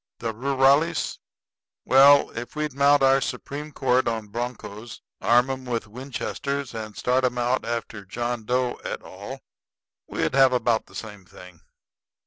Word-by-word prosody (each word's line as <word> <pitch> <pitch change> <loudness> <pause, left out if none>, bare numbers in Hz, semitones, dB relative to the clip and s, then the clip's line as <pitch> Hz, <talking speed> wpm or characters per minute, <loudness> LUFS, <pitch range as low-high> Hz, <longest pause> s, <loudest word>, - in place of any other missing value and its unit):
The 115 -1 -3
rurales 135 +6 +2 0.7
well, 140 +2 +6
if 120 +3 -7
we'd 150 -2 -2
mount 140 +1 +4
our 135 0 +5
Supreme 145 +3 -5
Court 130 -3 +1
on 110 -2 -2
broncos, 115 -1 -6 0.2
arm 120 +3 +4
'em 130 0 -5
with 120 -3 -3
Winchesters, 135 +3 -4
and 110 -2 -7
start 125 +1 +1
'em 125 -1 0
out 125 +2 0
after 115 -3 -4
John 120 +4 -3
Doe 125 +2 -1
et - - -4
al. - - -9 0.7
we'd - - -2
have 135 -1 +5
about 120 -2 +1
the - - -17
same 105 -3 -8
thing. 90 -2 -15
125 Hz, 145 wpm, -24 LUFS, 115-135 Hz, 0.7 s, well